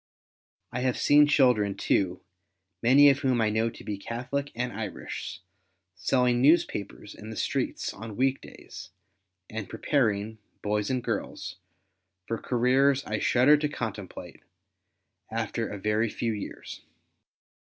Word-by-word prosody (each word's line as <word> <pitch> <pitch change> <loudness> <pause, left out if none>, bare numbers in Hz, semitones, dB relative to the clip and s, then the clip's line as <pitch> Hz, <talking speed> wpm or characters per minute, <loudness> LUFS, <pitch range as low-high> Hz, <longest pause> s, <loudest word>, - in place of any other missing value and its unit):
I 125 - -3
have 125 -1 0
seen 145 0 +5
children 125 -9 +3
too, 90 -2 0 0.6
many 140 +4 +7
of 135 - -1
whom 130 -4 +1
I 110 -1 +2
know 110 +2 +1
to 115 - -12
be 105 -2 -4
Catholic 125 +6 -4
and 120 +1 -2
Irish, 105 -6 -6 0.5
selling 120 +6 +1
newspapers 125 - +1
in 110 - -10
the 110 - -6
streets - - -2
on 110 -1 -8
weekdays, 135 +1 -3 0.6
and 110 -2 -6
preparing, 110 -4 0 0.2
boys 105 0 0
and 130 -2 -1
girls, 115 -4 -4 0.7
for 115 - -2
careers 130 +3 +2
I 105 0 -2
shudder 135 +5 +5
to 150 0 -1
contemplate, 110 -8 -6 0.9
after - - -2
a 105 - -6
very 105 +3 0
few 115 +1 -2
years. 105 - -7
115 Hz, 130 wpm, -27 LUFS, 105-130 Hz, 0.9 s, many